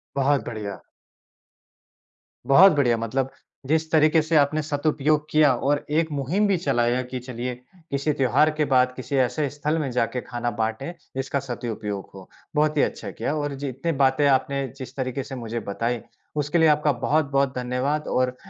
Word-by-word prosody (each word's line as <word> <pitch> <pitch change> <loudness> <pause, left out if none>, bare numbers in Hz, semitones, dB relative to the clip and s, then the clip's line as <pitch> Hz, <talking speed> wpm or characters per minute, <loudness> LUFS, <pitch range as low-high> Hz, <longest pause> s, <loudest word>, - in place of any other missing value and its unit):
बहुत 140 0 +2
बढ़िया। 105 -4 -6 1.7
बहुत 180 +8 +8
बढ़िया। 125 -5 +3
मतलब 130 +4 -2 0.4
जिस 160 +1 0
तरीके 155 0 +5
से 160 +1 -1
आपने 150 +2 +3
सदुपयोग 150 0 0
किया 150 -3 +5
और 145 +4 0
एक 160 +1 +1
मुहिम 150 +9 0
भी 195 -2 +2
चलाया 125 -6 +1
कि 125 0 -6
चलिए 125 0 -5 0.4
किसी 140 +2 0
त्यौहार 140 +3 +3
के 150 - +2
बाद 125 0 +4
किसी 130 +2 -4
ऐसे 135 +3 +1
स्थल 150 +3 -2
में 145 -3 -2
जाके 125 +1 -1
खाना 120 0 -3
बाँटें 115 +8 -2 0.2
जिसका 135 +1 -1
सदुपयोग 115 -6 -5
हो। 95 -1 -12 0.3
बहुत 150 0 +2
ही - - +5
अच्छा - - -3
किया। 150 - -3
और 145 -2 -2
जितनी 135 +5 -2
बातें 135 +2 +3
आपने 140 0 +1
जिस 130 -1 -9
तरीके 130 0 -2
से 135 - -8
मुझे 115 -1 -4
बताई, 115 +3 -2 0.3
उसके 150 +3 0
लिए 160 -1 +5
आपका 150 0 +3
बहुत-बहुत 140 -3 +1
धन्यवाद। 125 +4 -1
और 125 0 0
135 Hz, 165 wpm, -24 LUFS, 125-150 Hz, 1.7 s, बहुत